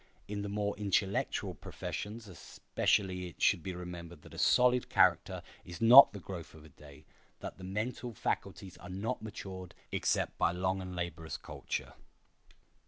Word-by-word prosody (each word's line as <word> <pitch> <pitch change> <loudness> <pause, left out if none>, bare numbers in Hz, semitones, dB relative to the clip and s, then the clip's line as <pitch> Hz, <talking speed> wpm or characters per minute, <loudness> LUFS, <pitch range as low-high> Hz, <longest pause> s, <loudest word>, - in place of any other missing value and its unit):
In 100 0 -3
the 100 - -4
more 100 0 -1
intellectual 100 -1 0
professions 110 +2 -6
especially 90 +1 -1
it 85 - -13
should 100 -4 +4
be 90 +2 -5
remembered 85 -2 -8
that - - -14
a - - -7
solid 125 0 +4
character - - +3 0.2
is 85 - -9
not 120 +5 +10
the 100 - -8
growth 85 -4 -8
of 80 0 -14
a - - -14
day, 75 +1 -15 0.3
that - - -7
the - - -10
mental 110 +6 -3
faculties 95 -1 -3
are 90 - -10
not 105 +7 -3
matured 95 -4 -8 0.2
except - - 0
by 85 - +3
long 95 +1 -1
and 90 -1 -6
laborious 80 -2 -4
culture. - - -5
95 Hz, 160 wpm, -33 LUFS, 85-105 Hz, 0.3 s, not